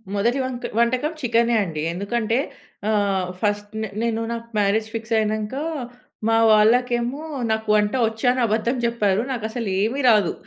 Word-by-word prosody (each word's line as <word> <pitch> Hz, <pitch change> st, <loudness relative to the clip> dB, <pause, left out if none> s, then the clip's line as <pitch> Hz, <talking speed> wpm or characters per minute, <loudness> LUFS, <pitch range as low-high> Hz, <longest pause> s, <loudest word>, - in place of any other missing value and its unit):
మొదటి 235 Hz, +6 st, +1 dB
వంక 255 Hz, -1 st, -5 dB, 0.2 s
వంటకం 255 Hz, +6 st, +1 dB
చికెనే 235 Hz, -1 st, +2 dB
అండి. 155 Hz, -5 st, -4 dB
ఎందుకంటే 225 Hz, +5 st, -1 dB, 0.5 s
ఆహ్, 200 Hz, -3 st, +1 dB
ఫస్ట్ 205 Hz, -1 st, -1 dB
నె 220 Hz, -, -2 dB
నేను 230 Hz, -1 st, 0 dB
నాకు 230 Hz, 0 st, -5 dB
మ్యారేజ్ 210 Hz, +2 st, +1 dB
ఫిక్స్ 225 Hz, 0 st, -4 dB
అయినంక 215 Hz, +2 st, -1 dB, 0.7 s
మా 225 Hz, 0 st, +3 dB
వాళ్ళకేమో 240 Hz, +4 st, +3 dB, 0.3 s
నాకు 220 Hz, 0 st, -1 dB
వంట 210 Hz, 0 st, +2 dB
వచ్చని 245 Hz, +3 st, 0 dB
అబద్ధం 225 Hz, +3 st, 0 dB
చెప్పారు. 210 Hz, -4 st, +1 dB
నాకు 235 Hz, -4 st, -3 dB
అసలు 230 Hz, -2 st, -4 dB
ఏమీ 240 Hz, +7 st, 0 dB
రాదు. 210 Hz, -6 st, +4 dB
225 Hz, 145 wpm, -22 LUFS, 210-240 Hz, 0.7 s, రాదు